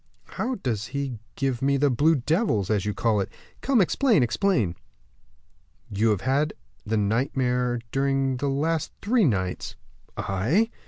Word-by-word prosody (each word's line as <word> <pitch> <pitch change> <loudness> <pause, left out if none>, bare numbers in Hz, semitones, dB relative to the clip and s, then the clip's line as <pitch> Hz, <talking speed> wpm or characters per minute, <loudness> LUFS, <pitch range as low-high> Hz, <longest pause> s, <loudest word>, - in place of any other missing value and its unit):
"How 255 +1 -2
does 115 - -3
he 135 -5 -3 0.2
give 135 -3 -1
me 140 +1 +2
the 140 0 +3
blue 150 +6 +3
devils, 135 - 0
as 105 -1 0
you 105 - 0
call 110 -3 +1
it? 95 - -3 0.3
Come, 270 -3 +2
explain, 210 - +3
explain." 120 - +1 1.2
"You 105 +3 +2
have 105 -3 +1
had 140 +5 +1 0.3
the 110 +1 -1
nightmare 125 +3 0
during 135 -1 +1
the 140 +2 -1
last 155 +3 0
three 225 0 +3
nights." 95 - -1 0.4
"I?" 135 - +1
135 Hz, 145 wpm, -25 LUFS, 110-155 Hz, 1.2 s, the